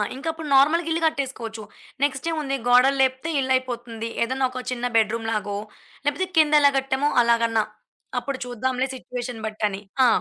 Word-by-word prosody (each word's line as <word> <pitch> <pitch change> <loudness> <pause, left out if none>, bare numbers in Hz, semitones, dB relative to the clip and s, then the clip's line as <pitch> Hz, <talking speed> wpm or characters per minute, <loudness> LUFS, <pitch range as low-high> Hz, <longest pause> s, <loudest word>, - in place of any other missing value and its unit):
ఇంకా 275 +5 -7
అప్పుడు 320 -1 -8
నార్మల్‌గా 310 +5 +4
ఇల్లు 325 +1 0
కట్టేసుకోవచ్చు. 255 -7 -2 0.4
నెక్స్ట్ 285 +2 0
ఏముంది? 295 -4 -2
గోడలు 250 +3 +5
లేపితే 260 +4 +1
ఇల్లు 260 -1 -1
అయిపోతుంది. 240 -3 -4
ఏదైనా 260 +3 0
ఒక 255 - -5
చిన్న 245 -1 -3
బెడ్‌రూం 225 +1 +2
లాగో, 205 -2 -2 0.5
లేకపోతే 290 +7 0
కింద 305 -1 +5
ఎలా 285 - +7
కట్టామో 270 +2 +1
అలాగన్నా 230 -2 +2 0.6
అప్పుడు 275 +2 -4
చూద్దాంలే! 250 +2 -1
సిట్యుయేషన్ 245 -2 -6
బట్టి 215 0 -6
అని. 195 0 -6 0.2
ఆ! - - +6
260 Hz, 160 wpm, -24 LUFS, 230-280 Hz, 0.6 s, ఎలా